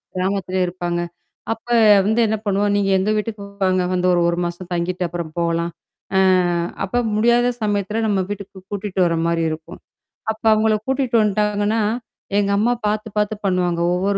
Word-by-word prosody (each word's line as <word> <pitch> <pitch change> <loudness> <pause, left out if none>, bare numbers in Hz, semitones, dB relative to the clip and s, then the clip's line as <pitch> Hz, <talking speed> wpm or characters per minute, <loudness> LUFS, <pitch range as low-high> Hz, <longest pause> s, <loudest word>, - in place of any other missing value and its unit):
கிராமத்தில 185 0 -1
இருப்பாங்க. 175 -1 -3 0.5
அப்ப 225 +1 -17 0.4
வந்து 220 +3 +2
என்ன 220 +1 0
பண்ணுவோம், 205 0 +1
நீங்க 200 -1 +1
எங்க 190 +3 0
வீட்டுக்கு 210 -1 -4 0.2
வாங்க 185 -1 +2
வந்து 180 0 +1
ஒரு 175 - +2
ஒரு 170 - -1
மாசம் 175 +1 -6
தங்கிட்டு 175 +1 -1
அப்புறம் 170 -2 -5
போலாம். 170 0 0 0.5
அ - - +5 0.6
அப்ப 200 +5 -2 0.2
முடியாத 235 +3 +3
சமயத்துல 210 +1 -1
நம்ம 200 -2 +1
வீட்டுக்கு 200 -1 -7
கூட்டிட்டு 200 -1 -4
வர 165 -1 +1
மாரி 170 0 +1
இருக்கும். 160 +3 -7 0.5
அப்ப 220 - -10
அவங்கள 215 0 +3
கூட்டிட்டு 265 -2 0
வந்துட்டாங்கன்னா, 210 +1 +1 0.6
எங்க 200 -1 +2
அம்மா 230 +4 +2
பாத்து 215 +1 -1
பாத்து 210 +1 +1
பண்ணுவாங்க, 180 -2 +1
ஒவ்வொரு 195 +2 0
200 Hz, 155 wpm, -20 LUFS, 180-210 Hz, 0.6 s, அ